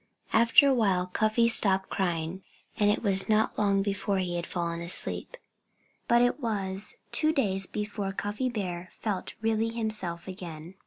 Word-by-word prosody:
After 230 +5 +6
a 275 - +4
while 195 -7 +1
Cuffy 215 +5 +1
stopped 195 -4 +4
crying. 175 -1 -2 0.4
And 205 -1 +4
it 210 - 0
was 195 -2 +3
not 215 0 +2
long 200 -2 +2
before 200 0 -1
he 180 -2 -2
had 170 0 -4
fallen 170 -1 -3
asleep. 175 - 0 0.7
But 235 0 +4
it 245 +4 +1
was 200 -5 -1 0.2
two 310 0 +2
days 195 - 0
before 210 -1 -4
Cuffy 205 +6 -3
Bear 185 -6 -5
felt 205 -4 -4
really 225 0 +1
himself 215 -7 -2
again. 175 -3 -8
200 Hz, 155 wpm, -28 LUFS, 185-220 Hz, 0.7 s, After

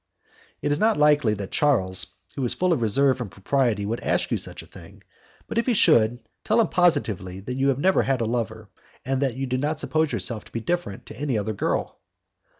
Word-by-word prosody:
"It 145 - 0
is 145 - +1
not 220 +1 +3
likely 145 -7 +4
that 100 -2 -6
Charles, 95 -11 +2 0.3
who 140 - -3
is 120 - +1
full 185 -1 +2
of 145 - -1
reserve 130 +3 +2
and 115 - -4
propriety, 110 +1 0
would 115 +3 -2
ask - - -1
you - - +2
such - - -4
a - - -14
thing, - - -15 0.4
but - - -1
if 230 - -2
he 245 - +2
should, 120 - +3 0.2
tell 220 +2 +2
him 225 - +3
positively 110 - +1
that 125 +6 -5
you 135 +2 +2
never 185 +8 +3
had 135 -2 0
a 115 - 0
lover, 110 -2 -3 0.3
and 135 +1 -1
that 130 -3 -1
you 135 - -2
do 130 0 -1
not 150 +2 -1
suppose 155 +2 0
yourself 110 0 -2
to - - -17
be 115 - -3
different 115 - -3
to 110 - -11
any 140 -5 -1
other 105 +1 -2
girl." 100 - -2
130 Hz, 220 wpm, -24 LUFS, 110-150 Hz, 0.4 s, likely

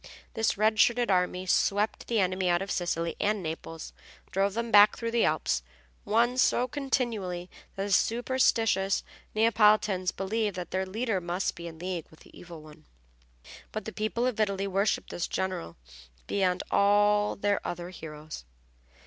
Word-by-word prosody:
This 225 -2 0
red 215 +1 +2
shirted 240 -1 +3
army 180 0 +1
swept 205 +3 +1
the 230 -2 +1
enemy 185 -1 +1
out 175 +2 +2
of 200 - -6
Sicily 170 -2 -1
and 210 -2 0
Naples, 165 0 -6 0.4
drove 195 +1 0
them 235 0 -2
back 205 0 +7
through 230 -1 -3
the 235 0 +3
Alps, - - 0 0.4
won 235 +4 +2
so 250 -1 +3
continually 230 -10 -2 0.2
that 195 - -3
the 200 - -4
superstitious 225 -4 +2 0.3
Neapolitans 210 -4 +3
believed 205 +1 -2
that 180 -2 -6
their 190 0 -1
leader 215 0 -1
must 175 +2 -2
be 170 0 -8
in 160 -1 -9
league 175 -1 -4
with 160 - -20
the - - -18
Evil 170 -3 -11
One. 155 -1 -15 0.9
But 215 - -5
the 220 - -6
people 220 +3 -1
of 250 -4 -1
Italy 200 -2 0
worshiped 195 +2 0
this 175 - -3
general 135 - -3 0.5
beyond 185 -2 0
all 205 +1 +3
their 205 0 0
other 175 +1 -5
heroes. 155 - -9
200 Hz, 155 wpm, -28 LUFS, 180-220 Hz, 0.9 s, back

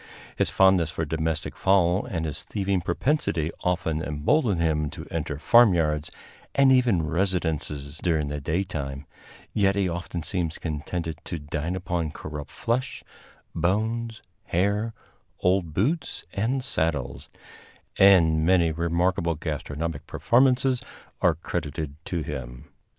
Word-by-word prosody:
His - - +1
fondness 95 -4 +4
for 80 +1 -3
domestic 80 +1 -2
fowl 95 -1 +3
and 80 -4 -2
his 75 -3 -3
thieving 100 -2 -1
propensity 85 - 0
often 85 -3 -1
embolden 85 - +1
him 75 -2 +1
to 85 0 -8
enter 80 -4 -3
farmyards 80 -7 +4 0.5
and 135 -1 +6
even 120 -10 +4
residences 80 -4 -1
during 80 -4 0
the 75 0 -4
daytime; 75 -4 -3 0.5
yet 100 -1 +3
he 100 -2 +1
often 85 -1 -4
seems 85 -3 -2
contented 80 +1 -4
to 85 - -4
dine 80 +3 -3
upon 85 -3 -2
corrupt 75 -1 -7
flesh, 120 - -2 0.5
bones, 110 +6 -1 0.2
hair, 100 +5 0 0.4
old 90 -3 +1
boots 130 - -1
and 120 +6 0
saddles, 80 - -2 0.7
and 85 -5 +6
many 85 -1 +4
remarkable 85 +1 0
gastronomic 80 +1 -4
performances 130 0 +3 0.4
are - - +4
credited 75 0 -4
to 85 -3 -2
him. 65 -1 -7
85 Hz, 120 wpm, -26 LUFS, 75-95 Hz, 0.7 s, and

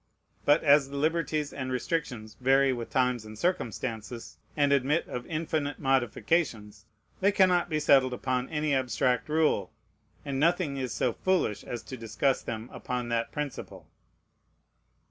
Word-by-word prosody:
But 145 +2 +4
as 145 -2 +5
the 140 - -6
liberties 155 -1 0
and 130 -2 -4
the - - -2
restrictions 125 -6 -3
vary 135 +1 +4
with 120 -2 -5
times 125 -3 +1
and 110 0 -10
circumstances, 115 - -3 0.2
and 145 -1 +3
admit 140 +4 +1
of 125 0 -6
infinite 155 -2 -2
modifications, 120 -4 0 0.3
they 200 +2 +3
cannot 180 -3 +3
be 155 -2 0
settled 135 -3 +4
upon 125 0 -2
any 150 -2 0
abstract 125 0 0
rule; 150 - +1 0.5
and 135 -1 -2
nothing 170 -2 +2
is 130 -3 -3
so 120 +3 0
foolish 185 - 0
as 120 -2 -6
to 130 - -8
discuss 115 +4 0
them 115 0 -5
upon 125 -1 -4
that 115 0 -1
principle. 150 -2 -6
135 Hz, 145 wpm, -28 LUFS, 120-150 Hz, 0.5 s, as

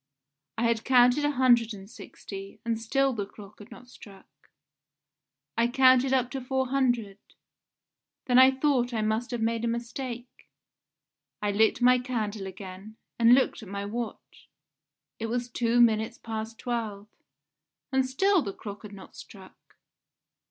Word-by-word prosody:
I 230 - -1
had 230 -1 +1
counted 250 +3 +4
a - - +2
hundred 240 -5 +3
and 195 -1 -12
sixty, 195 -2 -10
and 230 -1 -2
still 270 +4 +1
the 205 -4 -4
clock 205 0 -14
had 210 - -13
not 250 - -13
struck. 200 -5 -15 1.3
I 230 +1 +2
counted 260 +1 +4
up 255 -2 +1
to 270 - -4
four 260 0 -2
hundred; 240 -7 0 1.1
then 250 0 +4
I 260 0 +8
thought 265 -3 0
I 220 - 0
must 220 +3 -1
have 240 -3 -3
made 230 0 -1
a - - 0
mistake. 240 +1 -6 0.9
I 205 -1 -1
lit 220 +3 +2
my 250 0 +6
candle 220 -5 -4
again, 190 +2 -10 0.2
and 235 +1 +7
looked 260 - 0
at 210 - -11
my 200 0 -4
watch: 230 +3 -7 0.7
it 225 - -3
was 240 +1 -2
two 240 0 0
minutes 225 0 +3
past 220 0 -6
twelve. 220 -4 -4 0.9
And 265 0 +2
still 360 +9 +2
the 200 -7 -5
clock 205 0 -9
had 210 -2 -11
not 195 - -13
struck! 190 -2 -15
235 Hz, 150 wpm, -27 LUFS, 215-255 Hz, 1.3 s, I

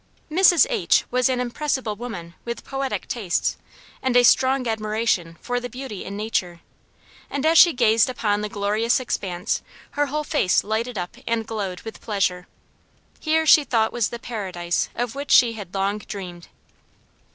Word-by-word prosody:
Mrs. 360 +3 +6
H. 465 - +2
was 250 +1 +2
an 255 -1 0
impressible 250 -2 -2
woman 200 -7 -7
with 235 0 -6
poetic 270 0 -3
tastes, 205 -8 -1 0.5
and 260 -2 +2
a 245 - +6
strong 260 +1 +4
admiration 215 -6 -1
for 245 0 -2
the 245 0 -6
beautiful 250 -5 -7
in 200 +1 -6
nature; 180 -5 -2 0.7
and 280 +1 -3
as 325 +1 +4
she 345 - +8
gazed 225 -3 +3
upon 210 -4 -1
the 210 - -3
glorious 210 +4 +1
expanse 190 -7 -2 0.3
her 290 0 0
whole 300 +2 -2
face 290 - +2
lighted 220 +2 -2
up 180 +6 -5
and 230 -1 0
glowed 200 -5 -4
with 225 - -9
pleasure. 185 -4 -1 0.7
Here 320 0 +1
she 305 -1 +7
thought 225 -5 +1
was 240 -3 0
the 235 - -6
paradise 185 -8 -3
of 245 -1 -2
which 280 +1 -6
she 235 -2 +6
had 200 -4 -9
long 200 +2 0
dreamed. 180 -5 -8
225 Hz, 165 wpm, -23 LUFS, 200-255 Hz, 0.7 s, she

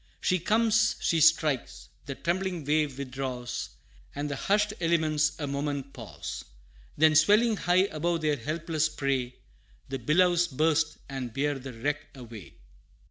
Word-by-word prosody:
She 185 - +1
comes, 220 +3 +2
she 165 -1 +1
strikes! 150 -10 +2 0.2
the 140 - -4
trembling 180 -1 -2
wave 150 -2 +1
withdraws, 130 -2 -4 0.5
And 145 +1 -3
the - - -2
hushed 210 +7 +1
elements 155 -2 +2
a 145 - -2
moment 140 -1 -3
pause; 115 -5 -7 0.5
Then 155 +1 +5
swelling 210 +9 +5
high 180 -1 +3
above 170 -1 -2
their 150 -2 +1
helpless 155 +4 -1
prey, 135 -4 -2 0.5
The 135 0 -3
billows 175 +6 +3
burst, 160 +1 +1
and 130 -3 -5
bear 140 +2 -1
the 135 0 -8
wreck 145 +5 -3
away! 115 -6 -11
150 Hz, 135 wpm, -28 LUFS, 135-170 Hz, 0.5 s, Then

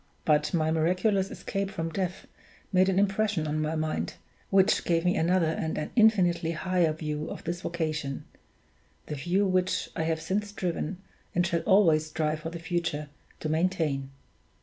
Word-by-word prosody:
But 150 -1 +3
my 160 -3 +1
miraculous 185 +5 +2
escape 195 0 -3
from 165 -3 -4
death 185 +1 -3 0.5
made 185 +1 +5
an 190 - +1
impression 200 -3 +1
on 155 0 -1
my 155 +1 -1
mind, 155 0 -2 0.3
which 195 -1 +4
gave 165 0 +1
me 180 - +3
another 175 +1 +3
and 160 0 -2
an 150 - -3
infinitely 180 -8 +4
higher 175 0 +1
view 150 -1 -4
of - - -7
this 175 +1 -3
vocation 155 -6 -3 0.8
the - - -5
view 175 +8 +1
which 185 -1 +1
I 160 - -1
have 160 0 0
since 205 +5 -1
striven, 180 -2 -3 0.4
and 175 0 +3
shall 170 -1 0
always 165 -6 +5
strive 155 0 -1
for 160 - -5
the 170 - -6
future, 165 -3 -2 0.3
to - - -2
maintain. 155 -5 0
170 Hz, 165 wpm, -28 LUFS, 155-185 Hz, 0.8 s, made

